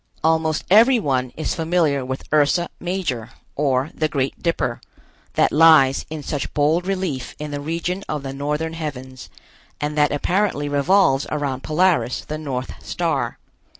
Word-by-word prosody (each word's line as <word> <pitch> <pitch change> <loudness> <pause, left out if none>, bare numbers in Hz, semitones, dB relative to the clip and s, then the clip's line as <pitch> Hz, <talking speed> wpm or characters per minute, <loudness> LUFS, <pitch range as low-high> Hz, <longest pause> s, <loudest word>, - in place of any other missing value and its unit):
Almost 160 -1 +1
everyone 200 - +4
is 155 - -1
familiar 160 -4 +1
with 130 +1 -5
Ursa 155 +4 +3
Major, 175 - -3 0.3
or 135 0 0
the 155 - 0
Great 135 -3 -2
Dipper, 165 -8 -1 0.5
that - - +3
lies 150 -4 +5
in 155 -2 -6
such 145 -1 -3
bold 155 +5 +2
relief 185 -10 -3
in 150 0 -6
the 145 0 -4
region 170 +5 -3
of 150 -2 -3
the 135 -1 -5
northern 150 +3 -2
heavens, 130 -5 -7 0.5
and 150 0 -2
that 150 -1 +4
apparently 175 0 0
revolves 145 0 +3
around 140 -3 -2
Polaris, 160 -4 +1
the 155 0 -5
North 130 -4 -5
Star. - - -2
150 Hz, 145 wpm, -21 LUFS, 135-165 Hz, 0.5 s, lies